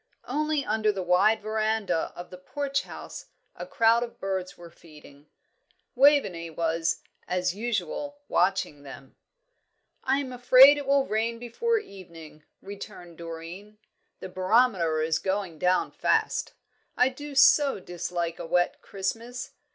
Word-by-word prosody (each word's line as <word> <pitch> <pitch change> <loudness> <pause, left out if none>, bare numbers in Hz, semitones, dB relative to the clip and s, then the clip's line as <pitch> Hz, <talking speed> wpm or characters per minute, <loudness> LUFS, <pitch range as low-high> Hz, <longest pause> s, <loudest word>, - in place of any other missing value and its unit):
Only 300 +1 -1
under 215 0 +1
the 195 -2 -4
wide 195 +5 +3
verandah 215 -5 -1
of 175 - -9
the 180 - -9
Porch 275 +8 -2
House - - -10 0.3
a - - -8
crowd 230 +1 +3
of 240 -1 -6
birds 190 -1 -4
were 170 -1 -12
feeding. 150 -3 -17 0.7
Waveney 245 - +3
was, 165 0 -1 0.2
as 180 0 0
usual, 235 - -3
watching 180 -5 0
them. 135 -1 -12 0.9
"I 265 +1 +2
am 270 -3 -4
afraid 255 +3 +7
it 280 - -7
will 275 -1 +3
rain 230 0 -1
before 450 - -1
evening," 170 - -11 0.2
returned 195 -4 -10
Doreen. 170 +5 -9 0.4
"The - - -7
barometer 185 -5 +2
is 160 0 0
going 190 -4 -3
down 180 +3 +1
fast. - - 0 0.4
I 250 - +4
do 290 +2 -9
so 275 -1 +5
dislike 175 -2 -4
a 170 - -5
wet 175 +1 +1
Christmas." 230 +6 -5
200 Hz, 135 wpm, -26 LUFS, 175-250 Hz, 0.9 s, afraid